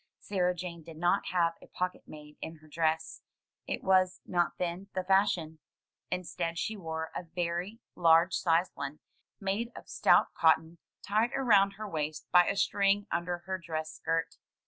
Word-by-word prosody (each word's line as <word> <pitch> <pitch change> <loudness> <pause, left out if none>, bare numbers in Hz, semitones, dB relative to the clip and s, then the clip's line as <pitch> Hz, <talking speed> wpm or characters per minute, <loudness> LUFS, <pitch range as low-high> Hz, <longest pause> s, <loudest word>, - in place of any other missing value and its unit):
Sarah 180 -3 0
Jane 170 -1 -6
did 160 0 -12
not 175 +4 +1
have 170 -2 +2
a - - -14
pocket 180 0 -4
made 150 -1 -12
in 160 - -6
her 155 0 -19
dress; 160 0 -1 0.5
it - - -3
was 185 -1 +3
not 175 -2 0
then 180 +2 -3
the 185 - 0
fashion. 185 -5 +2 0.5
Instead, 175 -2 -3
she 220 - -2
wore 160 -4 -5
a - - -2
very 175 +5 -3
large 165 +1 +5
sized 170 +1 +2
one, 140 +1 -5 0.4
made 205 +4 -2
of - - -11
stout - - +4
cotton, 160 +1 +3 0.2
tied 220 +4 +1
around 200 -7 +4
her 215 +2 -6
waist 155 -4 -3
by 175 -1 +6
a 200 - 0
string 200 0 +2
under 175 0 -2
her 190 0 -3
dress 160 -2 -4
skirt. 165 0 -2
175 Hz, 165 wpm, -31 LUFS, 165-195 Hz, 0.5 s, by